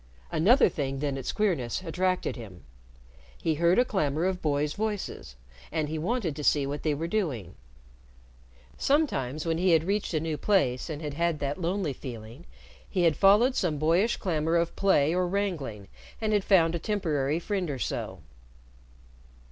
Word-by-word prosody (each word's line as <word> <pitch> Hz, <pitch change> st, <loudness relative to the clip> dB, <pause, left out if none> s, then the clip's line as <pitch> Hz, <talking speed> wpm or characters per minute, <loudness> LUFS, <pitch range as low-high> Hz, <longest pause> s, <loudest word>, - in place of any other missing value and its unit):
Another 235 Hz, -, +5 dB
thing 135 Hz, -2 st, -3 dB
than 140 Hz, 0 st, -2 dB
its 135 Hz, -, -3 dB
queerness 180 Hz, -, -1 dB
attracted 185 Hz, +2 st, -1 dB
him. 100 Hz, -8 st, -10 dB, 0.8 s
He 160 Hz, -, 0 dB
heard 170 Hz, +3 st, +3 dB
a 250 Hz, -, +5 dB
clamor 155 Hz, -, 0 dB
of 185 Hz, -1 st, -1 dB
boys' 150 Hz, 0 st, 0 dB
voices, 205 Hz, -, -4 dB, 0.4 s
and 155 Hz, -2 st, -1 dB
he 155 Hz, 0 st, -3 dB
wanted 185 Hz, -, -1 dB
to 150 Hz, -, -6 dB
see 145 Hz, -1 st, +3 dB
what 145 Hz, +2 st, -4 dB
they 150 Hz, -2 st, 0 dB
were 160 Hz, +3 st, -3 dB
doing. 140 Hz, -, -2 dB, 1.3 s
Sometimes, 155 Hz, -, 0 dB
when 165 Hz, 0 st, 0 dB
he 180 Hz, -1 st, +3 dB
had 160 Hz, -1 st, +4 dB
reached 195 Hz, -1 st, -1 dB
a -, -, +2 dB
new 155 Hz, -1 st, -2 dB
place 140 Hz, -10 st, +1 dB
and 155 Hz, 0 st, -5 dB
had 150 Hz, -2 st, -4 dB
had 170 Hz, +1 st, 0 dB
that 145 Hz, +4 st, -3 dB
lonely 175 Hz, -3 st, -1 dB
feeling, 115 Hz, -, -9 dB, 0.4 s
he 180 Hz, -, 0 dB
had 165 Hz, -3 st, +4 dB
followed 210 Hz, +7 st, +5 dB
some 160 Hz, -5 st, 0 dB
boyish 170 Hz, +10 st, +2 dB
clamor 165 Hz, -3 st, 0 dB
of 170 Hz, 0 st, +1 dB
play 160 Hz, -6 st, +3 dB
or 180 Hz, 0 st, +1 dB
wrangling, 165 Hz, -, -3 dB, 0.3 s
and 215 Hz, -1 st, 0 dB
had 205 Hz, -2 st, +2 dB
found 170 Hz, -5 st, +4 dB
a 170 Hz, -, -2 dB
temporary 155 Hz, -8 st, 0 dB
friend 190 Hz, -1 st, -2 dB
or 140 Hz, -, -3 dB
so. -, -, -4 dB
165 Hz, 170 wpm, -28 LUFS, 145-190 Hz, 1.3 s, Another